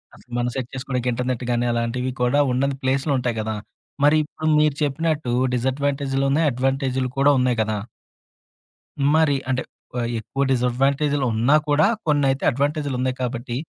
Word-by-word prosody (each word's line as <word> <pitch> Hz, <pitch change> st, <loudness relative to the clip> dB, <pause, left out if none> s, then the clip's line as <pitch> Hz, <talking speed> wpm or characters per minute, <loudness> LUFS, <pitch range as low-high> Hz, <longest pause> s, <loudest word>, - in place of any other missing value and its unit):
అసలు 125 Hz, -, -21 dB
మనం 120 Hz, 0 st, 0 dB
సెట్ 130 Hz, -2 st, -3 dB
చేసుకోడానికి 130 Hz, -2 st, -2 dB
ఇంటర్నెట్ 125 Hz, 0 st, -2 dB
గానీ 120 Hz, 0 st, +1 dB
అలాంటివి 120 Hz, +2 st, -1 dB
కూడా 125 Hz, +4 st, +3 dB
ఉనడని 135 Hz, +2 st, 0 dB
ప్లేసులు 135 Hz, +3 st, +1 dB
ఉంటాయి 120 Hz, -2 st, -2 dB
కదా! 110 Hz, 0 st, -3 dB, 0.5 s
మరి 150 Hz, +2 st, +5 dB
ఇప్పుడు 155 Hz, +1 st, -3 dB
మీరు 150 Hz, -2 st, +3 dB
చెప్పినట్టు 150 Hz, -1 st, -1 dB, 0.2 s
డిసడ్వాంటేజులు 135 Hz, +2 st, 0 dB, 0.2 s
అడ్వాంటేజూలు 130 Hz, 0 st, -1 dB
కూడా 140 Hz, +1 st, +5 dB
ఉన్నాయి 125 Hz, -2 st, +1 dB
కదా! 110 Hz, -1 st, -1 dB, 1.4 s
మరి 160 Hz, -3 st, +3 dB
అంటే 130 Hz, 0 st, 0 dB, 0.4 s
ఆహ్, 120 Hz, -1 st, -1 dB
ఎక్కువ 135 Hz, +5 st, -2 dB
డిసడ్వాంటేజులున్నా 135 Hz, 0 st, +2 dB
కూడా 145 Hz, +2 st, +4 dB, 0.2 s
కొన్నైతే 140 Hz, -3 st, +2 dB
అడ్వాంటేజులున్నాయి 140 Hz, -2 st, -1 dB
కాబట్టి 120 Hz, -1 st, -3 dB
130 Hz, 130 wpm, -22 LUFS, 125-140 Hz, 1.4 s, మరి